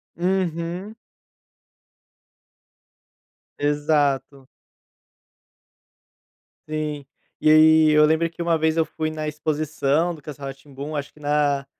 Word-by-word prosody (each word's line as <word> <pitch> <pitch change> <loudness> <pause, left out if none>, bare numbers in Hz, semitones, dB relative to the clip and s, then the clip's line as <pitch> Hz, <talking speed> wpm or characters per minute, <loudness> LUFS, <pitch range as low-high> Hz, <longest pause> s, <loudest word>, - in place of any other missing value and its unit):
Uhum. 180 +2 -2 2.6
Exato. 145 -2 0 2.2
Sim, 150 -2 -3 0.3
e 155 - +3
aí 155 0 +6
eu 150 0 +5
lembrei 160 +2 +2
que 170 +1 -9
uma 170 -1 +2
vez 160 0 +1
eu 165 - +3
fui 155 0 -4
na 155 -1 -5
exposição 155 +1 -1
do 155 - -12
Castelo 140 -1 -7
Ra-Tim-Bum 140 +2 -8
acho 140 0 -6
que - - -20
na 145 -1 0
155 Hz, 100 wpm, -23 LUFS, 145-160 Hz, 2.6 s, aí